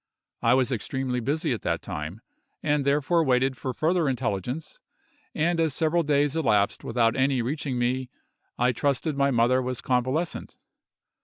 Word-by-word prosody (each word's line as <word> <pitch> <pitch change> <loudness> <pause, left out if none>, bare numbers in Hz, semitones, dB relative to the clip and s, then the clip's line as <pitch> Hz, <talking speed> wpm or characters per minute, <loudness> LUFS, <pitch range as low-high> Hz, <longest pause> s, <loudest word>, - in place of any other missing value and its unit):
I 115 +2 +4
was 130 0 +1
extremely 125 +1 -2
busy 140 +3 -1
at 115 - -5
that 85 -1 -2
time, 85 +2 -6 0.4
and 150 -2 +1
therefore 150 +4 +2
waited 130 -1 +2
for 130 +1 -4
further 160 +3 +1
intelligence; 125 - -3 0.6
and 170 +2 +1
as 160 -4 +1
several 165 +1 +2
days 145 -1 +1
elapsed 105 -10 +1
without 115 -1 +1
any 130 -2 +2
reaching 140 0 -3
me, 125 +1 -1 0.5
I 125 +1 +3
trusted 140 +4 0
my 140 0 +2
mother 125 +1 +3
was 125 -1 -3
convalescent. 130 +7 -1
130 Hz, 150 wpm, -26 LUFS, 120-150 Hz, 0.6 s, I